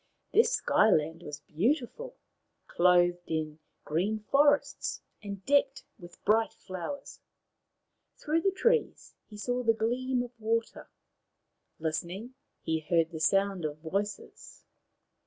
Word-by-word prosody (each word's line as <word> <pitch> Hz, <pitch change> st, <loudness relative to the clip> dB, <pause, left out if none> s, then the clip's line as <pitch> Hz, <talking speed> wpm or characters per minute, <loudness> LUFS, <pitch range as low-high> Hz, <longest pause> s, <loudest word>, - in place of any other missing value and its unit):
This 450 Hz, -, +5 dB
Sky 220 Hz, -, +3 dB
land 160 Hz, -3 st, +1 dB
was 150 Hz, -, -8 dB
beautiful, 270 Hz, -, -1 dB, 0.5 s
clothed 175 Hz, 0 st, +3 dB
in 155 Hz, -1 st, -3 dB, 0.3 s
green 185 Hz, +8 st, 0 dB
forests 285 Hz, +7 st, +2 dB, 0.2 s
and 200 Hz, -2 st, -7 dB
decked 280 Hz, -1 st, +2 dB, 0.2 s
with 175 Hz, 0 st, -14 dB
bright 220 Hz, +2 st, +3 dB
flowers. 190 Hz, +10 st, -7 dB, 1.0 s
Through 315 Hz, +2 st, 0 dB
the 390 Hz, -, +3 dB
trees 465 Hz, +5 st, 0 dB, 0.2 s
he 210 Hz, -, -11 dB
saw 245 Hz, +4 st, -1 dB
the 230 Hz, -2 st, +3 dB
gleam 245 Hz, +3 st, 0 dB
of 245 Hz, -, -9 dB
water. 225 Hz, +1 st, -2 dB, 0.9 s
Listening, 170 Hz, +9 st, -4 dB, 0.3 s
he 160 Hz, 0 st, 0 dB
heard 165 Hz, +1 st, +1 dB
the 160 Hz, -, -6 dB
sound 195 Hz, +2 st, +2 dB
of 150 Hz, -1 st, -3 dB
voices. 195 Hz, +6 st, -5 dB
205 Hz, 120 wpm, -30 LUFS, 170-250 Hz, 1.0 s, This